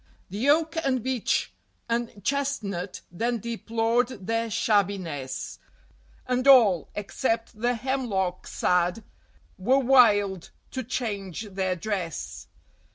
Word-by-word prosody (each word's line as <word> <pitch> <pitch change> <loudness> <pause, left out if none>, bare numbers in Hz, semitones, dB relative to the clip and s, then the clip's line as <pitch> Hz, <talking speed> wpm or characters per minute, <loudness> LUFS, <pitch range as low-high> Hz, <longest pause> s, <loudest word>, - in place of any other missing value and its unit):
The 220 +8 0
Oak 320 +2 +3
and 255 -4 0
Beech 260 -3 0 0.3
and 230 -4 -2
Chestnut 215 -10 -2
then 235 +7 -1
deplored 230 0 -1
their 230 +2 0
shabbiness, 190 - -1 0.7
And 255 +1 0
all, 220 - +6
except 225 +1 -2
the 245 +1 +2
Hemlock 220 -8 -2
sad, 180 +4 +1 0.6
were 250 +8 +3
wild 210 -8 +4 0.2
to 260 - -3
change 210 -7 -3
their 185 -1 0
dress. 180 -4 -4
225 Hz, 100 wpm, -26 LUFS, 190-250 Hz, 0.7 s, all